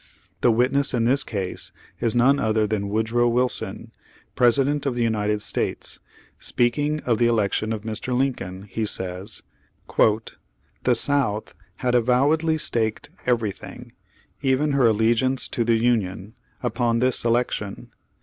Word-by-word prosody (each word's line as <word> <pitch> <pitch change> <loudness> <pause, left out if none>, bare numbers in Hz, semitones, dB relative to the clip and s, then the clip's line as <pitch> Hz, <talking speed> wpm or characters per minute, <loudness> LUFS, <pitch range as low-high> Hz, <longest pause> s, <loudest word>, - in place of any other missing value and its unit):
The - - +4
witness 130 +4 +2
in 115 - +1
this 135 +4 +2
case 95 -4 -4 0.3
is 115 -1 0
none 135 +4 +4
other 110 -3 +2
than 100 -1 -2
Woodrow 110 +3 +1
Wilson, 125 +1 -1 0.4
President 140 +4 +3
of 130 - -1
the 120 - 0
United 105 -2 0
States. - - -3 0.4
Speaking 145 +5 0
of 115 -3 0
the 120 - +4
election 110 -1 +1
of 110 -2 -3
Mr. 115 +3 -2
Lincoln, 100 -8 -2
he 105 +2 -4
says: 95 0 -2 0.5
"The 110 - 0
South 115 -5 0 0.2
had 125 +3 -1
avowedly 140 +7 +3
staked 110 -7 -2 0.2
everything, 115 -5 -2 0.5
even 140 +2 +2
her 135 -4 +4
allegiance 115 +4 +2
to 120 - -1
the 115 0 +3
Union, 110 -4 0 0.3
upon 120 0 +1
this 125 +1 +1
election. 115 -4 -1
120 Hz, 130 wpm, -23 LUFS, 110-130 Hz, 0.5 s, The